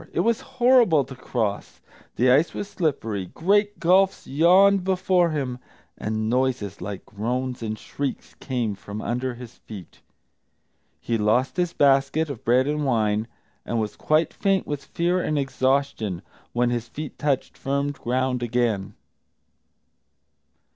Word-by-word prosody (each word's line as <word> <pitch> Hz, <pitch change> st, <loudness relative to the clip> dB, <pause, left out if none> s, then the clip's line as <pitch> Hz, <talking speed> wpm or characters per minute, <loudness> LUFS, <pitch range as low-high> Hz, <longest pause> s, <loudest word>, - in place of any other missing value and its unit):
It -, -, +1 dB
was 230 Hz, 0 st, +1 dB
horrible 245 Hz, -, +4 dB
to 130 Hz, -, -10 dB
cross, 110 Hz, -5 st, -3 dB, 0.4 s
the 125 Hz, +1 st, +4 dB
ice 145 Hz, +6 st, +3 dB
was 205 Hz, -, -4 dB
slippery, 130 Hz, -, -2 dB
great 205 Hz, -, +1 dB
gulfs 190 Hz, +3 st, +3 dB
yawned 185 Hz, +6 st, +5 dB
before 185 Hz, -2 st, +2 dB
him, 135 Hz, -5 st, -3 dB, 0.4 s
and 110 Hz, 0 st, -2 dB
noises 125 Hz, -5 st, -1 dB
like 100 Hz, +1 st, -6 dB
groans 125 Hz, +4 st, -3 dB
and 110 Hz, -1 st, -3 dB
shrieks 140 Hz, +5 st, -5 dB
came 120 Hz, -6 st, -2 dB
from 100 Hz, +2 st, -8 dB
under 125 Hz, +2 st, -2 dB
his 120 Hz, -1 st, -11 dB
feet. 100 Hz, -6 st, -11 dB, 1.0 s
He 115 Hz, -1 st, -2 dB
lost 110 Hz, +5 st, +2 dB
his 175 Hz, -1 st, 0 dB
basket 140 Hz, +3 st, +3 dB
of 120 Hz, -, -9 dB
bread 125 Hz, +3 st, +3 dB
and 150 Hz, +1 st, -1 dB
wine, 110 Hz, -4 st, +1 dB, 0.4 s
and 115 Hz, -, -2 dB
was 110 Hz, -1 st, -3 dB
quite 155 Hz, +1 st, +1 dB
faint 195 Hz, -1 st, +1 dB
with 145 Hz, -1 st, -4 dB
fear 175 Hz, +2 st, 0 dB
and 155 Hz, -, -1 dB
exhaustion 130 Hz, -8 st, 0 dB, 0.3 s
when 120 Hz, 0 st, +1 dB
his 120 Hz, -1 st, -2 dB
feet 150 Hz, +3 st, -8 dB
touched 140 Hz, -3 st, -1 dB
firm 140 Hz, +1 st, -1 dB
ground 130 Hz, -1 st, -1 dB
again. 120 Hz, -5 st, -1 dB
130 Hz, 140 wpm, -24 LUFS, 115-160 Hz, 1.0 s, yawned